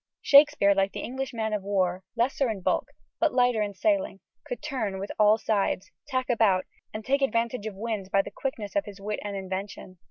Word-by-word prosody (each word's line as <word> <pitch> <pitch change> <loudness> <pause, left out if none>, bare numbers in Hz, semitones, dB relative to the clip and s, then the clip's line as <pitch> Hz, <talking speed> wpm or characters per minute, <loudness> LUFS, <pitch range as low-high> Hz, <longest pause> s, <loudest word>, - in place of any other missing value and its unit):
Shakespeare, 280 -8 +6
like 195 0 +1
the - - -4
English 265 +2 -4
man 220 -2 -2
of 210 - -1
war, 190 -2 0
lesser 250 +2 +1
in 210 -4 -4
bulk, - - 0 0.3
but 320 -6 +2
lighter 245 -3 +3
in 205 -1 -2
sailing, 295 - 0 0.3
could - - -4
turn 240 -10 -2
with 195 +1 -5
all 210 +1 +6
sides, 205 -3 -1 0.2
tack 255 -1 -1
about, 215 -6 +3 0.3
and 215 0 -7
take 275 +1 +1
advantage 230 -3 0
of 210 - -6
all 200 - -9
winds 215 -5 -3
by 195 0 +3
the - - -8
quickness 225 -7 -5
of 300 - +1
his 205 -1 -10
wit 210 +1 -3
and 205 -1 -4
invention." 190 -1 -6
215 Hz, 210 wpm, -27 LUFS, 195-255 Hz, 0.3 s, Shakespeare